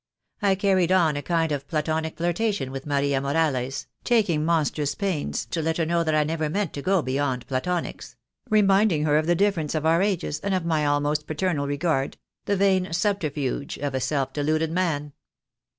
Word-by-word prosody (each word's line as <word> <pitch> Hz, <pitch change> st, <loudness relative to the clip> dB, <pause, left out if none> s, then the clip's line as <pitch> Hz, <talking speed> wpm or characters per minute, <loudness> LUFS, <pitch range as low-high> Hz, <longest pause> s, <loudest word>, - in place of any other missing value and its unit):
I 200 Hz, -1 st, +3 dB
carried 190 Hz, -2 st, +2 dB
on 170 Hz, -5 st, +3 dB
a 145 Hz, -, -2 dB
kind 165 Hz, 0 st, 0 dB
of 140 Hz, -1 st, -3 dB
Platonic 160 Hz, 0 st, -2 dB
flirtation 175 Hz, -4 st, -1 dB
with 135 Hz, +2 st, -6 dB
Maria 140 Hz, -1 st, +1 dB
Morales, 140 Hz, -3 st, 0 dB, 0.2 s
taking 200 Hz, -11 st, +2 dB
monstrous 155 Hz, -3 st, 0 dB
pains 190 Hz, -7 st, -2 dB
to 165 Hz, -, -3 dB
let 160 Hz, +1 st, -1 dB
her 165 Hz, -, +1 dB
know 170 Hz, +1 st, +1 dB
that 155 Hz, -1 st, +1 dB
I 155 Hz, -, +4 dB
never 155 Hz, 0 st, -2 dB
meant 195 Hz, +1 st, -1 dB
to 140 Hz, -, -5 dB
go 185 Hz, +1 st, +2 dB
beyond 130 Hz, -2 st, -1 dB
Platonics 165 Hz, +7 st, -3 dB, 0.2 s
— -, -, -33 dB
reminding 200 Hz, -6 st, +4 dB
her 150 Hz, -1 st, +3 dB
of 155 Hz, -, -2 dB
the 175 Hz, -, +3 dB
difference 170 Hz, -6 st, 0 dB
of 155 Hz, 0 st, -1 dB
our 165 Hz, +2 st, +4 dB
ages, 190 Hz, -6 st, -1 dB
and 200 Hz, -1 st, -1 dB
of 180 Hz, -3 st, -2 dB
my 155 Hz, -3 st, +1 dB
almost 145 Hz, +1 st, 0 dB
paternal 155 Hz, -2 st, -1 dB
regard 145 Hz, -1 st, -1 dB
— -, -, -59 dB
the 200 Hz, -, +1 dB
vain 190 Hz, -2 st, +2 dB
subterfuge 155 Hz, -7 st, -1 dB
of 145 Hz, -1 st, -3 dB
a 130 Hz, -, 0 dB
self 135 Hz, 0 st, -1 dB
deluded 155 Hz, +2 st, 0 dB
man. 155 Hz, -5 st, -1 dB
160 Hz, 190 wpm, -25 LUFS, 145-180 Hz, 0.2 s, I